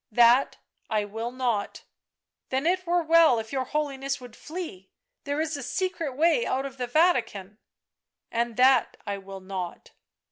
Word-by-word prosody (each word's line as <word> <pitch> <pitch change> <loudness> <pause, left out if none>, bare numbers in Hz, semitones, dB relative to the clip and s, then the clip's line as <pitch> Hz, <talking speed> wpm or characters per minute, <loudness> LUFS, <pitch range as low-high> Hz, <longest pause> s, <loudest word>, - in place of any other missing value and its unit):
" - - -59
That 245 +4 +4 0.3
I 215 -2 0
will 225 +3 -4
not." 245 -5 -2 0.3
" - - -60
Then 265 +3 -1
it 365 +1 +1
were 350 0 +2
well 325 -5 +5
if 220 0 -5
your 260 -1 -1
Holiness 275 -2 -2
would 245 -3 -12
flee; 305 - -7 0.4
there 285 +1 -2
is 315 0 -1
a 285 - -5
secret 330 -1 -2
way 340 +10 +3
out 265 - -1
of 270 -1 -7
the 250 -1 -3
Vatican 240 - +1 0.2
" - - -63
" - - -58
And 235 -1 -1
that 255 -1 +4
I 200 -1 -3
will 195 0 -10
not." 185 -2 -6
260 Hz, 180 wpm, -26 LUFS, 220-310 Hz, 0.4 s, well